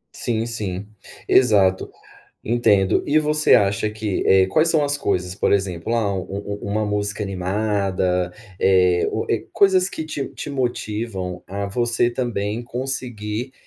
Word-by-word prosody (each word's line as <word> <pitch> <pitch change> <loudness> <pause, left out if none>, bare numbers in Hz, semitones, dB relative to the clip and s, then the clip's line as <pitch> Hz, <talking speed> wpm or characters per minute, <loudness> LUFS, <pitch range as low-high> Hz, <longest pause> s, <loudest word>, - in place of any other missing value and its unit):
Sim, 115 -1 -2
sim, 105 -4 -4 0.4
exato, 100 -7 +3 0.5
entendo. 105 -5 +2
E 150 +2 +3
você 150 0 +3
acha 100 +1 +3
que, 105 -2 -2
eh, 95 -1 +5
quais 155 - +2
são 155 -3 +3
as 145 0 0
coisas, 90 -7 -1
por 100 - +1
exemplo, 95 0 -1
ah, 105 -4 0
um-um 100 +2 -5
uma 105 +2 -1
música 105 0 -2
animada, 95 -2 -1 0.3
eh, 90 -2 +3
ou, - - -3
eh, - - 0
coisas 190 -2 +4
que 160 - -5
te 150 -3 -4
te - - -7
motivam 110 -8 -3
a 100 +1 -4
você 120 +3 +1
também 120 -3 -3
conseguir, 120 -2 -4
105 Hz, 140 wpm, -21 LUFS, 95-120 Hz, 0.5 s, eh